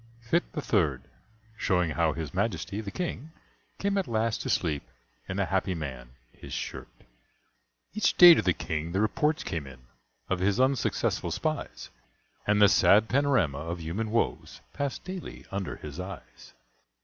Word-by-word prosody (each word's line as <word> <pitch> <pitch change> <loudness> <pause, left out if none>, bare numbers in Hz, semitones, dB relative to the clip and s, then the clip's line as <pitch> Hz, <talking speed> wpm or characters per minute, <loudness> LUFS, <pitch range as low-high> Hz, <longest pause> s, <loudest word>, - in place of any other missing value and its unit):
Fytte 140 +9 -1
the 150 - -4
Third: 75 - +1 0.5
shewing 90 -7 +1
how 80 0 +2
His 80 -1 -5
Majesty 100 0 -2
the 105 - -6
King 160 - -4 0.5
came 200 0 0
at 190 - -2
last 115 0 0
to - - -4
sleep 75 -5 0 0.5
in 95 - -3
a 100 - +1
Happy 95 -1 0
Man 65 -6 -6 0.2
his - - -11
Shirt. - - -5 1.1
Each 215 +1 +1
day 175 -1 +11
to 160 - +2
the 90 -3 +2
King 80 0 -3
the 95 - +1
reports 150 +9 +1
came 80 -4 -4
in 65 -1 -12 0.5
Of 95 - -1
his 100 +5 +1
unsuccessful 130 0 +1
spies, - - -3 0.6
And 105 0 +3
the 105 - +8
sad 105 +2 +5
panorama 125 - +2
of 85 +3 -4
human 90 +8 -3
woes 110 - -1
Passed 140 -2 -3
daily 185 -1 -7
under 100 -2 -3
his 75 +2 -9
eyes. 95 -7 -9
100 Hz, 160 wpm, -28 LUFS, 85-125 Hz, 1.1 s, day